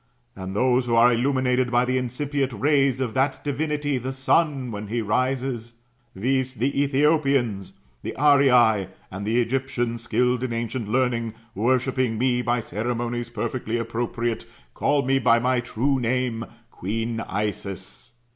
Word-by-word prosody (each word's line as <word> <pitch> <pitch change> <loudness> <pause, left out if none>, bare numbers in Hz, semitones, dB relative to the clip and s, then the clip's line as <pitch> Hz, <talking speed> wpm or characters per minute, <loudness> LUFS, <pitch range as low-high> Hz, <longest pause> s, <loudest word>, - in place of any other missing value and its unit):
And 95 0 -6
those 125 +2 +2
who 115 - +2
are 120 +1 +6
illuminated 130 0 +1
by 120 +1 +3
the 130 +1 +1
incipient 135 +2 -2
rays 135 +2 +2
of 125 -4 -2
that 135 +1 +1
divinity 145 -1 -1
the 130 +2 -4
Sun, 135 -1 +1
when 105 0 -6
he 115 +3 -2
rises, 125 +1 -1 0.4
viz. 130 +5 0
the 135 +5 0
Ethiopians, 140 - +1 0.3
the - - -5
Arii, 125 - +5 0.2
and 95 +2 -5
the 115 +3 +2
Egyptians 120 -1 -1
skilled 125 +1 +1
in 130 -2 -2
ancient 115 0 -3
learning, 115 -1 0 0.2
worshipping 125 +2 +1
me 125 +1 +1
by 120 0 0
ceremonies 120 +2 -3
perfectly 120 0 -3
appropriate, 115 0 -2 0.3
call 145 -2 +1
me 135 +1 +2
by 115 -3 +4
my 125 +1 +1
true 130 +3 0
name, 120 -1 -1 0.3
queen 115 +4 -3
Isis. 105 +1 -5
125 Hz, 140 wpm, -24 LUFS, 115-130 Hz, 0.4 s, are